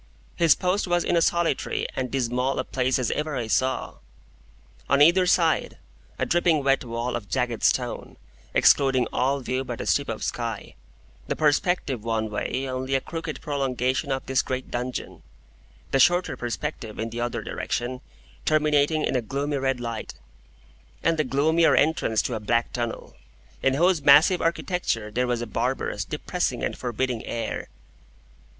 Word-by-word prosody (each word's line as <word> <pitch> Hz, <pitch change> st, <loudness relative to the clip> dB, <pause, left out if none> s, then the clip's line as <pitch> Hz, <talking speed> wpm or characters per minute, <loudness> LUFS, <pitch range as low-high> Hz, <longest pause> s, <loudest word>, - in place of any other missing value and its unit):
His 165 Hz, -4 st, +5 dB
post 185 Hz, +2 st, 0 dB
was 175 Hz, -1 st, +2 dB
in -, -, +1 dB
as 170 Hz, -, +4 dB
solitary 170 Hz, -5 st, 0 dB
and 130 Hz, -1 st, -2 dB
dismal 125 Hz, 0 st, 0 dB
a 130 Hz, -, 0 dB
place 130 Hz, 0 st, 0 dB
as 125 Hz, -3 st, -1 dB
ever 150 Hz, -1 st, -2 dB
I 120 Hz, -3 st, -2 dB
saw. 130 Hz, +4 st, -1 dB, 0.9 s
On 140 Hz, -, +4 dB
either 175 Hz, +5 st, +6 dB
side, 165 Hz, -3 st, +2 dB, 0.4 s
a -, -, 0 dB
dripping 170 Hz, -4 st, +2 dB
wet 135 Hz, 0 st, +2 dB
wall 120 Hz, +1 st, -3 dB
of 105 Hz, -5 st, -6 dB
jagged 120 Hz, +4 st, -1 dB
stone, -, -, 0 dB, 0.4 s
excluding 135 Hz, -3 st, +4 dB
all 135 Hz, +2 st, +1 dB
view 130 Hz, +1 st, -2 dB
but -, -, -6 dB
a -, -, -4 dB
strip -, -, +1 dB
of -, -, -4 dB
sky; -, -, -4 dB, 0.5 s
the -, -, -1 dB
perspective 145 Hz, -, +1 dB
one 110 Hz, -1 st, -1 dB
way 130 Hz, +5 st, -2 dB
only 130 Hz, +1 st, -2 dB
a -, -, +3 dB
crooked 160 Hz, -1 st, -6 dB
prolongation 135 Hz, -1 st, -1 dB
of 135 Hz, 0 st, -2 dB
this 130 Hz, -1 st, +2 dB
great 130 Hz, 0 st, -4 dB
dungeon; 125 Hz, +1 st, -4 dB, 0.7 s
the 135 Hz, -, +2 dB
shorter 175 Hz, +6 st, +3 dB
perspective 120 Hz, -2 st, -5 dB
in 115 Hz, +1 st, -3 dB
the 120 Hz, +1 st, -4 dB
other 120 Hz, 0 st, -2 dB
direction 125 Hz, +2 st, -3 dB, 0.4 s
terminating 150 Hz, 0 st, +2 dB
in -, -, -1 dB
a 125 Hz, -, +2 dB
gloomy 140 Hz, +5 st, -2 dB
red 135 Hz, -2 st, 0 dB
light, 115 Hz, -2 st, -5 dB, 0.9 s
and 165 Hz, 0 st, +2 dB
the -, -, +4 dB
gloomier 155 Hz, +5 st, +3 dB
entrance 115 Hz, -, +2 dB
to -, -, -2 dB
a 110 Hz, -, -2 dB
black 115 Hz, +3 st, 0 dB
tunnel, 120 Hz, -2 st, -4 dB, 0.5 s
in 135 Hz, 0 st, +2 dB
whose 175 Hz, +2 st, +3 dB
massive 150 Hz, +6 st, +6 dB
architecture 165 Hz, -, -1 dB
there 125 Hz, +3 st, 0 dB
was 120 Hz, -1 st, -1 dB
a -, -, -3 dB
barbarous, 105 Hz, -, -2 dB
depressing, -, -, -2 dB
and -, -, -1 dB
forbidding 125 Hz, -1 st, -2 dB
air. 115 Hz, -1 st, -4 dB
135 Hz, 160 wpm, -25 LUFS, 120-155 Hz, 0.9 s, either